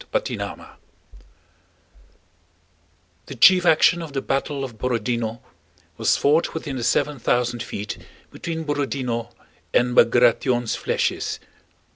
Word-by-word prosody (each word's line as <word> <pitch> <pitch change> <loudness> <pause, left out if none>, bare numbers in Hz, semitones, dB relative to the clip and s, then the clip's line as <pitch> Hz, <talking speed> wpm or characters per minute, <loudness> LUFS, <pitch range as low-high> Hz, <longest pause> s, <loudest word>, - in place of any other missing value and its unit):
CHAPTER - - -1
XXXIII - - -6 2.6
The - - -8
chief 180 -1 +6
action 170 +2 +4
of 160 -4 -8
the 135 - -1
battle 135 +1 -2
of 120 -5 -8
Borodinó 120 -1 -2 0.6
was - - +2
fought 155 +4 +2
within 145 -4 -4
the 120 - -4
seven 145 +3 +1
thousand 120 0 0
feet 105 +1 -6 0.3
between 160 -1 -5
Borodinó 135 -5 -2 0.4
and 125 0 +2
Bagratión's 120 0 +3
flèches. - - -1
130 Hz, 110 wpm, -22 LUFS, 120-150 Hz, 2.6 s, chief